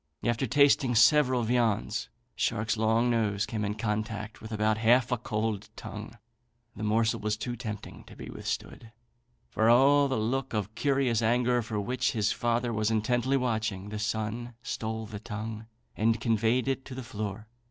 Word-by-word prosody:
After 120 +3 0
tasting 140 -1 +4
several 125 +1 +5
viands, 110 -3 0 0.3
Shark's 110 +2 0
long 110 +2 +2
nose 105 -3 +1
came 110 -2 -3
in 105 0 -2
contact 110 0 -3
with 110 - -9
about 110 0 +1
half 120 +3 +4
a 125 - +2
cold 110 -3 -2
tongue; - - -8 0.6
the 105 - -8
morsel 110 +1 +1
was 105 +1 -1
too 120 +2 -4
tempting 105 -2 -7
to - - -13
be - - -9
withstood. 115 - -5 0.6
For 110 +1 +2
all 140 +4 +6
the 130 - -1
look 130 +4 -1
of 105 0 -2
curious 135 -4 +1
anger 120 +2 +2
with 110 -3 -3
which 130 +2 0
his 105 -4 +1
father 120 0 0
was 105 0 +1
intently 120 +4 +1
watching, 110 -6 -2
the 105 0 -5
son 110 +2 -3
stole 110 0 -3
the 105 -1 -7
tongue 110 0 -6 0.3
and 115 +1 +2
conveyed 115 +2 +1
it 135 0 -1
to 130 - -8
the 130 - -6
floor. 105 -3 -5
115 Hz, 165 wpm, -29 LUFS, 110-120 Hz, 0.6 s, all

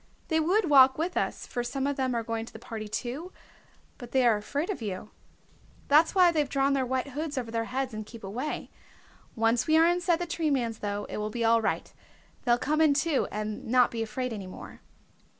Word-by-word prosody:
They 320 -1 +2
would 360 +5 +2
walk 265 -3 +7
with 335 +4 -2
us, - - -2
for 245 - -3
some 265 +3 -2
of 285 0 0
them 260 -2 -1
are 230 - -1
going 225 0 -3
to - - -11
the - - -8
party 220 -2 -7
too, 260 - -4 0.7
but 245 -1 -10
they 260 -2 +4
are 230 -2 +5
afraid 285 - -2
of 370 - -6
you. 205 -1 -5 0.8
That's 310 +6 +5
why 360 -2 +6
they've 300 -4 0
drawn 275 0 +2
their 265 -2 0
white 260 +2 -1
hoods 295 +1 -4
over 235 -3 -3
their 230 0 -1
heads 260 0 -3
and 215 0 -4
keep 225 +1 -12
away. 245 +10 -4 0.6
Once 230 +3 +2
we 315 0 +5
are 325 - +6
inside 350 0 +2
the 350 - -3
Tree 330 -2 -1
Man's, 235 -5 -1
though, 205 0 -3
it - - -6
will 210 0 -2
be 230 +1 -2
all 230 0 +4
right. 220 - -2 0.5
They'll 240 -1 +4
come 305 +5 0
in 300 -3 +5
too, 300 -1 +1
and 210 0 -4
not 250 +1 +4
be 230 - -3
afraid 250 +2 -3
any 200 -3 -6
more." 185 - -11
255 Hz, 220 wpm, -28 LUFS, 225-300 Hz, 0.8 s, walk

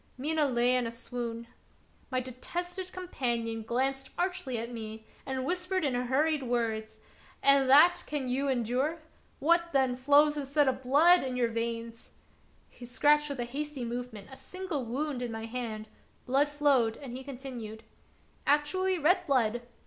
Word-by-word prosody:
Mina 305 +3 +1
lay 245 -1 +2
in 250 -2 +1
a - - -4
swoon. 235 -1 -5 0.6
My 255 - 0
detested 350 +9 -5
companion 235 -10 -2
glanced 265 +4 -1
archly 360 -8 -2
at 230 +2 -5
me 220 -1 -7 0.2
and 260 -1 -2
whispered 360 +1 -1
in 270 - 0
hurried 270 +5 +1
words: 225 -3 -2 0.2
" - - -27
And 275 -1 +5
that 340 +6 +7
can 290 -3 -3
you 265 +3 0
endure? 260 +5 0 0.4
What, 340 +2 +2
then, 265 -2 +2
flows 290 +3 +4
instead 285 0 +1
of 260 0 0
blood 310 +8 +5
in 255 -1 -3
your 240 -2 +2
veins? 230 0 -4 0.3
" - - -35
He - - -14
scratched 295 +5 +3
with 275 -3 -3
a - - -2
hasty 280 +1 -4
movement 235 -4 -6
a 265 - -10
slight 375 +4 -8
wound 275 0 -2
in 245 -2 -3
my 225 0 -5
hand; 225 -2 -5 0.4
blood 275 +3 +2
flowed, 280 -6 +2
and 255 -4 -8
he 260 - -7
continued: 245 -5 -8 0.6
"Actually 365 +6 +2
red 355 +4 +3
blood 240 -4 +2
260 Hz, 160 wpm, -30 LUFS, 240-295 Hz, 0.6 s, that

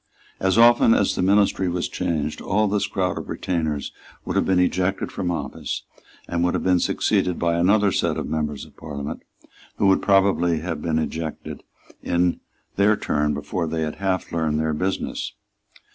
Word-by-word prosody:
As 95 +2 +1
often 115 -1 +6
as 100 - +2
the - - -2
ministry 95 -1 +3
was 85 0 -1
changed, 75 -2 -2
all 105 +2 +1
this 100 -1 0
crowd 95 -3 -1
of - - -9
retainers 80 -5 -2 0.3
would - - -3
have - - +2
been 95 - +3
ejected 90 +1 0
from 90 -3 -3
office, 80 -5 -4 0.4
and 85 0 -1
would 90 - +1
have - - -2
been 90 -1 +3
succeeded 90 +1 +1
by 85 -1 +1
another 100 +4 +3
set - - 0
of - - -3
members 75 -2 -3
of - - -19
Parliament 70 -3 -6 0.6
who - - +1
would 95 -1 +4
probably 95 -5 +3
have 80 -3 -4
been 80 -1 0
ejected 80 +1 -4 0.4
in 85 0 +1 0.4
their 105 +2 +4
turn 75 0 0
before 85 +4 -3
they 80 0 -2
had 75 -1 -4
half 95 -1 -1
learned 80 -2 0
their 80 0 0
business. 95 +5 -2
90 Hz, 175 wpm, -23 LUFS, 80-95 Hz, 0.6 s, often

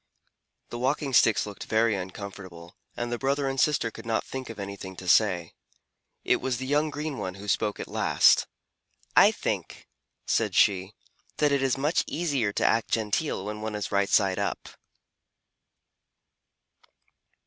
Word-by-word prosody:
The 120 - -6
Walking 135 +2 -1
Sticks 110 -4 +4
looked 105 -1 -8
very 110 0 +2
uncomfortable, 95 -2 -8 0.2
and 120 0 -3
the 120 - -2
brother 140 +1 0
and 135 0 -2
sister 135 -5 +2
could - - -10
not 115 -1 0
think 130 -2 -6
of 115 - -8
anything 100 -1 -7
to 90 - -9
say. 90 -4 +3 0.7
It - - +3
was 130 -2 -2
the 130 - -5
young 150 +3 +1
green 150 -1 -4
one 95 -1 -4
who 100 +1 -10
spoke 105 +1 0
at - - -5
last. - - +3 0.7
"I - - +8
think," - - -4 0.4
said - - 0
she, 95 +1 +3 0.4
"that 150 -1 +2
it 140 -1 +2
is 135 -1 +1
much 150 +5 +1
easier 140 -11 -1
to - - -1
act 115 0 +2
genteel 110 0 -1
when 105 0 -5
one 110 -1 -4
is 105 - -4
right 100 0 +1
side 95 -1 +3
up." 100 - -3
110 Hz, 160 wpm, -27 LUFS, 100-135 Hz, 0.7 s, I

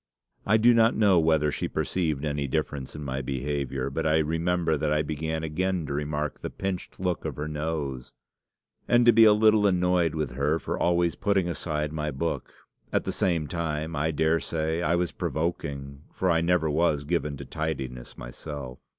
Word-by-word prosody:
I 110 +2 +5
do 120 +2 +6
not 115 0 +4
know 100 -5 +5
whether 80 -2 +3
she - - -2
perceived 80 -5 -1
any 70 -1 -1
difference 70 -2 -3
in 75 - -6
my 65 -1 -3
behaviour, 70 0 -2
but 80 +3 -1
I 80 0 +4
remember 80 +1 +1
that 75 0 -1
I 75 0 +2
began 80 +1 -3
again 90 +2 -1
to 70 - -4
remark 75 0 -2
the - - -5
pinched 95 -2 -5
look 90 -2 -1
of - - -4
her 75 +1 -4
nose, 75 -4 -3 0.8
and 120 0 +4
to 120 - +7
be 115 0 +7
a 110 - +8
little 105 -1 +4
annoyed 90 -3 +2
with 75 -5 -2
her 70 +5 +1
for - - -3
always 85 -1 +2
putting 100 -3 +1
aside 75 -3 -2
my 75 -1 -2
book. 80 +4 -3 0.4
At - - +1
the - - -2
same 85 -4 0
time, 80 0 -3
I 75 +2 0
daresay 80 +1 0
I 85 0 +2
was 90 -1 0
provoking, 70 -4 -3
for 95 -1 0
I 80 -1 +3
never 85 -1 +2
was 75 -1 +1
given 75 -2 -1
to 70 - -8
tidiness 65 -6 -5
myself. 65 +1 -8
80 Hz, 185 wpm, -27 LUFS, 75-85 Hz, 0.8 s, a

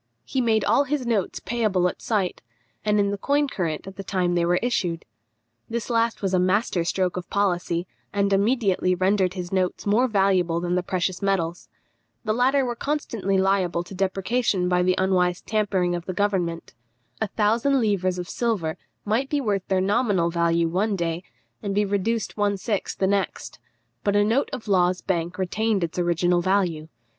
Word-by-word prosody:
He 260 - -1
made 220 -3 +2
all 285 - +3
his 275 -1 -2
notes 220 -5 -1
payable 210 -5 +1
at - - -5
sight, 200 -5 -1 0.4
and 210 0 +2
in 200 0 +2
the 200 - -3
coin 285 +5 +1
current 170 - -3
at 195 +1 -10
the 195 - -5
time 180 -2 0
they 175 -1 +2
were 175 +1 +2
issued. 175 -9 -1 0.6
This 235 +1 -3
last 230 -2 +1
was 190 -1 0
a 185 - +4
master 185 0 +1
stroke 180 +1 -1
of 180 - -6
policy, 175 -3 0 0.3
and 200 -1 +1
immediately 195 -3 +2
rendered 185 0 +1
his 180 -2 -5
notes 185 -1 -1
more 220 +5 +3
valuable 190 -6 +2
than 175 0 -2
the 180 - +2
precious 180 0 -2
metals. 175 -4 -1 0.5
The 215 -2 0
latter 260 +3 +3
were 240 -1 -2
constantly 230 -9 -1
liable 190 -3 +1
to 175 - -11
depreciation 195 +1 0
by 180 0 +2
the 180 0 +2
unwise 180 -1 +1
tampering 195 -5 0
of 175 -1 -4
the 185 - -2
government. 180 -4 -1 0.5
A 220 - +1
thousand 230 +7 +2
livres 190 -5 +1
of 180 -1 -4
silver 200 -10 -1 0.3
might 230 +6 0
be 295 - +1
worth 205 -7 -1
their 190 -1 +1
nominal 200 -4 +1
value 170 0 +2
one 200 +5 0
day, 170 -2 -2 0.4
and 200 -2 -3
be 210 0 +3
reduced 205 +2 -1
one 205 -1 +1
sixth 200 +1 -3
the 190 - +1
next, 195 -8 -2 0.4
but 200 - +1
a 205 - +5
note 230 +7 +1
of 255 -5 -6
Law's 180 -2 +2
bank 175 -1 -2
retained 200 +2 0
its 170 +1 -3
original 175 0 +2
value. 175 -4 0
195 Hz, 180 wpm, -24 LUFS, 180-215 Hz, 0.6 s, a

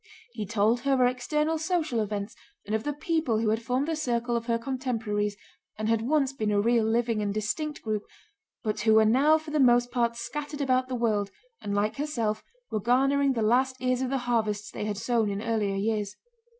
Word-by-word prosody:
He 215 -4 -5
told 220 +3 +2
her 275 +2 +1
of 255 - +1
external 300 +5 0
social 315 -7 0
events 210 0 -3 0.3
and 210 - -4
of 220 0 0
the 295 - 0
people 305 -5 0
who 220 0 +1
had 220 +1 0
formed 250 +5 -1
the 325 - 0
circle 240 -5 -1
of 230 0 -3
her 230 -1 +2
contemporaries 230 -5 -2 0.4
and 215 0 -2
had 225 -1 +2
once 275 +2 +1
been 215 -5 -2
a 205 -1 +2
real, 230 +1 +3
living, 230 -1 +1
and 205 -1 -1
distinct 255 +9 -3
group, 215 -2 -2 0.6
but 215 -2 -1
who 220 +1 +4
were 220 0 +6
now 275 +8 +5
for 315 -1 -9
the 305 - +1
most 245 -2 +4
part 235 -2 +1
scattered 290 +5 -5
about 255 -2 +1
the 255 - -3
world 215 -4 0 0.3
and 200 0 -3
like 210 +4 0
herself 235 -8 -1 0.3
were 215 - 0
garnering 270 +5 +3
the 230 -3 -1
last 255 +4 +2
ears 255 0 0
of 260 - -1
the 270 - 0
harvests 215 -4 -1
they - - -4
had 210 -1 -2
sown 225 -1 +1
in 200 0 -3
earlier 215 -3 -1
years. 210 0 -1
235 Hz, 210 wpm, -27 LUFS, 215-265 Hz, 0.6 s, were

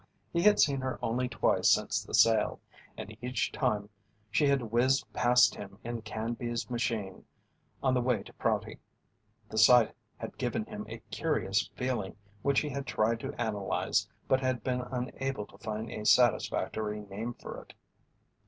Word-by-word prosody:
He 170 - +2
had 210 +3 +5
seen 140 -3 +3
her 130 0 -2
only 120 +2 0
twice 120 - +2
since - - +2
the - - -3
sale, 115 -1 +4 0.4
and 110 - -7
each 115 -4 -1
time 105 -1 0 0.4
she 145 +6 +3
had 135 -6 +1
whizzed 130 +3 +3
past 125 -2 +5
him 100 -1 -9
in 120 -1 -4
Canby's 115 +2 -4
machine 110 -5 -2 0.6
on 130 -1 +3
the 125 - +2
way 120 -4 +1
to - - -14
Prouty. - - -1 0.7
The 110 - -1
sight 120 +1 +7 0.2
had - - -8
given - - -1
him - - -7
a - - -8
curious 95 +2 0
feeling 125 -6 -2 0.3
which 140 +2 +2
he 150 - -3
had 140 0 -4
tried 110 +1 +1
to 135 +2 -6
analyze 105 -4 0 0.2
but 130 - +3
had 130 -4 -1
been 125 -1 0
unable 125 -1 -3
to - - -18
find 110 +2 -4
a 105 - -5
satisfactory 110 -2 +2
name 105 +4 -6
for - - -8
it. - - -17
120 Hz, 160 wpm, -30 LUFS, 110-130 Hz, 0.7 s, sight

